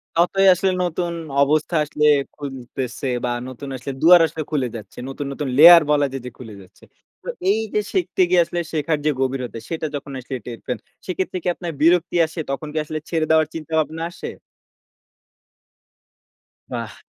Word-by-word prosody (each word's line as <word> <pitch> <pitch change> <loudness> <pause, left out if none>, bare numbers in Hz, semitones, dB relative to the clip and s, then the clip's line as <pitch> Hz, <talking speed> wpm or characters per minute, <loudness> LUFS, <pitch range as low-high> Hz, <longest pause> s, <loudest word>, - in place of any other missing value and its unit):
ততই 180 +3 +3
আসলে 190 +1 +1
নতুন 175 0 -2 0.3
অবস্থা 155 +4 +2
আসলে 150 0 -1 0.3
খুলতেছে 130 -2 -6 0.2
বা - - -1 0.2
নতুন 130 +2 -8
আসলে 130 +2 -5
দুয়ার 175 +1 +8
আসলে 160 0 -5
খুলে 140 -5 0
যাচ্ছে। 110 - -10
নতুন, 135 +2 -5
নতুন, 145 +1 -4
লেয়ার 170 +3 +10
বলা 145 -1 +3
যায় 135 -1 -5
যে - - -4
খুলে 115 -4 -9
যাচ্ছে। 95 - -20 0.4
তো - - -14 0.2
এই 210 +2 +3
যে - - +2
শিখতে 365 - 0
গিয়ে 180 -1 +5
আসলে 175 - -4
শেখার 155 0 0
যে 155 - +4
গভীরতা। 130 -3 -2
সেটা 160 -1 -3
যখন 140 0 -6
আসলে 130 +1 -5
টের 120 -2 -7
পান 125 - -2 0.3
সেক্ষেত্রে 185 0 -3
কি - - -4
আপনার 175 -2 -5
বিরক্তি 170 +2 +3
আসে? 160 +1 -8
তখন 140 +3 -4
কি - - -4
আসলে 155 +1 -4
ছেড়ে 160 -2 0
দেওয়ার 160 -1 +4
চিন্তাভাবনা 160 0 -2
আসে? - - -7 2.4
বাহ! - - -6
155 Hz, 170 wpm, -21 LUFS, 135-170 Hz, 2.4 s, লেয়ার